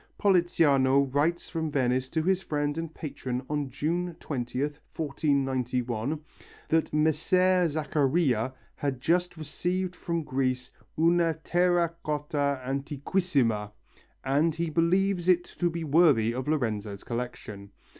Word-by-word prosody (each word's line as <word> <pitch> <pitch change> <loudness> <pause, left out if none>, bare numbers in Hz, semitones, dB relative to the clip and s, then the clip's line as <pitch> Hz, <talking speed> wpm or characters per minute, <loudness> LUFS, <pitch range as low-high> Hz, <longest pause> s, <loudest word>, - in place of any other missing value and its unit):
Politiano 150 -8 +4
writes 160 +5 +1
from 160 -2 -3
Venice 130 -2 0
to 160 +2 -1
his 190 +2 +2
friend 145 -4 -1
and 165 -1 -4
patron 130 -5 -5
on 145 -2 -2
June 170 +6 -2
20th, 140 +2 -3 0.2
1491, 135 -3 -1 0.5
that 160 0 +2
Messer 175 +4 +3
Zaccharia 145 -5 +1 0.2
has 140 -2 -2
just 175 +4 +1
received 180 +4 -2
from 170 -1 -3
Greece 130 -2 -1 0.3
una 165 0 +3
terra 175 -1 +2
cotta 145 -2 -1
antiquissima 135 - 0 0.5
and 145 +5 +2
that - - -15
he 165 -1 -1
believes 180 +2 +2
it 175 -1 +4
to 175 0 -2
be 170 0 -4
worthy 145 -8 +4
of 130 +2 -4
Lorenzo's 110 -9 -2
collection. 115 -4 -6
150 Hz, 120 wpm, -28 LUFS, 130-170 Hz, 0.5 s, Politiano